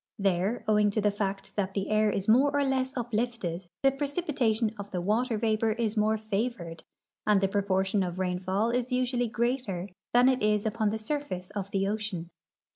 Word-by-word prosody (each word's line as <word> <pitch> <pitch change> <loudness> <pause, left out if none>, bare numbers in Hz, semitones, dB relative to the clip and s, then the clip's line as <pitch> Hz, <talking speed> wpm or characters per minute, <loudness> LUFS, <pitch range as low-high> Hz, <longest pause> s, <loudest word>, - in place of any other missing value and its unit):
There, 195 +3 0
owing 210 -1 +4
to 205 - -1
the 210 0 +3
fact 200 -1 -3
that 195 -1 -1
the 195 -1 -1
air 215 0 +4
is 195 -1 -2
more 255 +6 +5
or 285 0 +2
less 265 -1 0
uplifted, 225 -7 -2 0.2
the 270 - +6
precipitation 275 -6 0
of 200 0 -6
the 185 - -3
water 220 +6 +1
vapor 220 0 +1
is 225 -1 -1
more 215 0 +2
favored, 210 -5 -3 0.4
and 210 -2 +5
the 195 - +2
proportion 195 0 +1
of 180 -1 -2
rainfall 185 +4 0
is 250 +1 -1
usually 250 -1 +1
greater 230 -5 -1 0.2
than 245 +1 +5
it 260 -1 +3
is 210 0 +2
upon 220 0 +1
the 220 - -2
surface 220 -6 -4
of 200 -1 -4
the 195 0 0
ocean. 200 -5 -3
215 Hz, 185 wpm, -28 LUFS, 195-240 Hz, 0.4 s, the